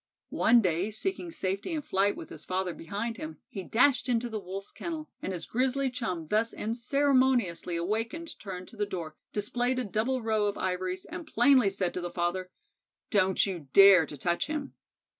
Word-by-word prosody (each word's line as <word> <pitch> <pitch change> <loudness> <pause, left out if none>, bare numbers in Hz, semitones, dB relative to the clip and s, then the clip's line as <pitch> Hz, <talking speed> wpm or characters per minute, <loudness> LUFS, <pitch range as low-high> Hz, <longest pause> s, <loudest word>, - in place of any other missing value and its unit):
One 235 +1 +5
day, 180 +2 +1
seeking 355 - -3
safety 195 - -3
in 305 -2 -2
flight 200 -2 +1
with - - -8
his 155 -1 -9
father 185 -1 -2
behind 205 +8 -4
him, 310 +1 -7
he 195 - -6
dashed 250 +6 +3
into 240 0 +1
the 220 -1 -3
Wolf's 195 +1 -7
kennel, 320 -3 -6
and - - -3
his 175 -3 -4
grizzly 260 +2 0
chum 185 -10 -3
thus 220 +5 +1
unceremoniously 245 -6 +1
awakened 225 - -3
turned 185 -3 -7
to - - -14
the 205 -1 -1
door, 165 -5 -5 0.2
displayed 245 +5 -1
a 255 - 0
double 230 +4 -1
row 215 -2 +1
of 205 - -2
ivories, 185 0 -2
and 340 -1 -7
plainly 265 -9 +5
said 190 -2 -1
to 180 - -3
the 175 - -3
father: 175 +1 -2 0.6
"Don't 190 -3 +3
you 175 -7 -5
dare 195 -5 +8
to 145 - -8
touch 175 +4 0
him." 300 -2 -4
210 Hz, 180 wpm, -29 LUFS, 185-255 Hz, 0.6 s, dare